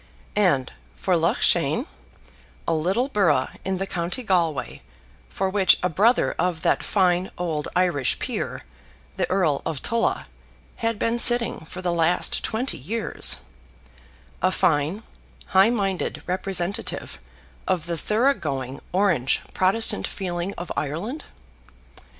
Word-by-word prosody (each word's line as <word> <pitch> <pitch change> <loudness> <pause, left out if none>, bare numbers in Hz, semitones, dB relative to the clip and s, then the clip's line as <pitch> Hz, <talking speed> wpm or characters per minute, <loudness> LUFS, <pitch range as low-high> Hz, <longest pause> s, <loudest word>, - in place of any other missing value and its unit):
And 175 -11 +2 0.2
for 185 - 0
Loughshane, 170 - +2 0.8
a 165 - +2
little 185 +11 +1
borough 195 - +2
in 190 0 -1
the 195 - -2
county 180 +6 -3
Galway, 170 - 0 0.5
for 190 - -1
which 190 0 +4
a 180 - +2
brother 215 +9 +3
of 170 -1 -1
that - - +2
fine 185 -2 +1
old 160 -4 -2
Irish 175 -7 +2
peer, - - -4 0.5
the - - 0
Earl 175 -7 +1
of 155 -5 -4
Tulla, 230 0 0 0.5
had 230 -1 -1
been 230 +3 0
sitting 240 -9 +4
for 180 +3 -8
the 175 -1 0
last 170 +1 +2
twenty 240 +5 -2
years, 210 - +1 1.0
a 185 - +3
fine, 165 +3 +1 0.5
high 190 +3 +5
minded 195 -6 -2
representative 185 - -2 0.5
of 175 -4 0
the 170 -1 -2
thorough 225 - +2
going 135 - -4
Orange 180 -9 +2
Protestant 195 +5 +2
feeling 180 -1 -4
of 175 - -6
Ireland! 175 - -4
180 Hz, 125 wpm, -24 LUFS, 165-205 Hz, 1.0 s, high